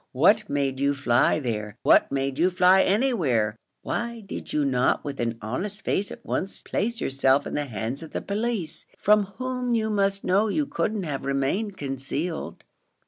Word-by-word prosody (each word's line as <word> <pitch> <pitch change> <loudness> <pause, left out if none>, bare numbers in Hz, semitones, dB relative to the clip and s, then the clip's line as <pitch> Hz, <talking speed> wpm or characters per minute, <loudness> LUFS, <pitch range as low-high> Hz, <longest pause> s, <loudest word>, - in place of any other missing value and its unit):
What - - +4
made 140 -2 -1
you 140 +1 +2
fly 125 +1 +3
there? 110 -5 -4
what - - +5
made 135 0 -1
you 175 +3 +4
fly 185 +1 +5
anywhere? 170 - +1 0.3
why 235 -1 -3
did 195 - -7
you 150 -1 +1
not 125 -2 +2
with 140 -1 -5
an 115 -1 -1
honest 190 - -4
face 200 0 0
at - - -10
once 190 - -2
place 235 +3 -2
yourself 135 -2 +2
in - - -5
the 145 - -1
hands 115 +3 -4
of 160 - -8
the - - -2
police, 210 -5 -3
from 210 0 +4
whom 250 -1 -1
you 220 -1 0
must 200 -1 +1
know 200 +4 +3
you 295 +8 0
couldn't 215 -7 -2
have 145 -5 -4
remained 140 +10 -1
concealed?" 140 +4 -4
160 Hz, 175 wpm, -25 LUFS, 135-210 Hz, 0.3 s, what